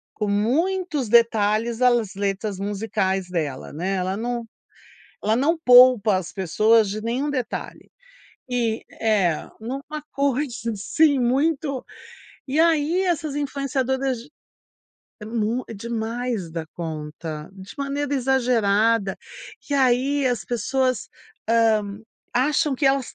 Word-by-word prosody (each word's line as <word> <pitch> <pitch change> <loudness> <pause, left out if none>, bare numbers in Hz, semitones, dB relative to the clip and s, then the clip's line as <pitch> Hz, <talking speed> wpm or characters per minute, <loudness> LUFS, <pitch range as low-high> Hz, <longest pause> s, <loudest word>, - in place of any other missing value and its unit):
com 210 - -2
muitos 290 - 0
detalhes 225 0 +3
as 240 -5 +2
letras 200 0 -2
musicais 195 -2 -1
dela, 155 -7 -3
né. 185 +6 -2
Ela 185 +2 -2
não 240 0 -3 0.8
ela 215 +2 +2
não 300 +7 +2
poupa 245 -4 +7
as 185 - -5
pessoas 215 +4 +3
de 215 +2 -4
nenhum 245 +6 -1
detalhe. 255 -5 -5 0.6
E, 235 -2 -1 0.2
eh, 205 -7 +2 0.3
em 220 - -10
uma 280 +4 -5
coisa 265 -4 -1
assim 285 +8 +2
muito. 275 +2 0 0.6
E 275 +4 0
aí 330 +1 +2
essas 315 -5 -1
influenciadoras 270 -2 -1 1.0
é - - -7
mu 230 +2 -1
é - - -6
demais 230 -2 -3
da 160 -1 -5
conta, 155 -1 -6
de 195 0 -11
maneira 280 +1 -2
exagerada. 230 -6 +2 0.5
E - - +1
aí 270 +1 +2
as 245 -2 -1
pessoas, 255 +1 -1 0.4
hã, 220 -3 +2 0.4
acham 295 +3 +2
que 270 - -2
elas 270 -2 +1
235 Hz, 120 wpm, -23 LUFS, 205-270 Hz, 1.0 s, poupa